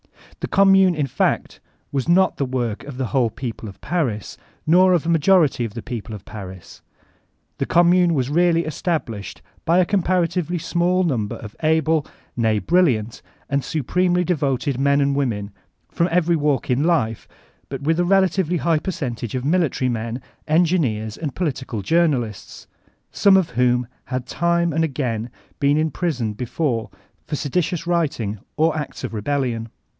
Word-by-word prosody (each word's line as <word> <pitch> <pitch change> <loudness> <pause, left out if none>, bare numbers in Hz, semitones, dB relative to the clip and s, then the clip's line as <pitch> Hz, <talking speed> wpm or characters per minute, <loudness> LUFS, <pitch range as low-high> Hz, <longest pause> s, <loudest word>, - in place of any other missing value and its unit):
The - - -3
Q)mmune, 195 -2 +5
in 150 -2 0
fact, 135 - -1 0.3
was 140 +2 -2
not 185 +2 +4
the 140 - 0
woric 120 -4 -2
of 140 -3 -8
the 130 - -1
whole 120 +2 +1
people 115 -2 -6
of 95 - -13
Paris, 130 - -2 0.3
nor 185 +3 +5
of 170 -3 +1
a - - -1
majority 165 -5 +3
of 115 -2 -5
the 115 - -6
people 115 -3 -6
of 100 - -11
Paris. 95 -4 -10 0.8
The - - -1
Gnnmune 175 0 +4
was 130 -4 0
reaOy 170 +1 +3
estab 155 0 -1
lished 105 -3 -8 0.2
by 170 +2 +3
a 185 - +5
comparatively 180 -2 0
small 175 +3 +1
number 120 - -1
of 110 -2 -10
able, 160 -1 +2 0.3
nay 110 -2 +2
brilliant, 120 - +1 0.3
and 140 -1 0
supremely 180 +4 +1
devoted 140 -6 -1
men 140 +1 +3
and 140 0 +2
women 110 -7 -1 0.4
from 170 - +1
every 170 0 +2
walk 145 -3 0
in 130 +4 +2
life, 155 -10 0 0.4
but 135 0 -6
with 160 +3 +1
a - - +3
relatively 190 -2 +2
high 160 0 +1
percentage 130 - -4
of 130 0 -3
military 155 -5 +1
men, 115 +1 -3 0.3
engineers, 155 -11 +1
and 150 -5 -5
political 130 - -3
journalists, 135 - 0 0.5
some 195 -1 +5
of 185 -7 0
whom 125 0 +2 0.2
had 130 -1 -3
time 170 +4 +1
and 160 +2 +1
again 125 -6 -2 0.3
been 145 0 +3
in 155 0 +1
prison 125 -6 -2
before 120 +1 -2 0.4
for 150 - -2
seditious 165 +4 -1
writing 140 - -1 0.2
or 160 +1 +2
acts 150 -3 -5
of 130 - -4
rebellion. 115 0 -2
145 Hz, 160 wpm, -21 LUFS, 120-170 Hz, 0.8 s, Q)mmune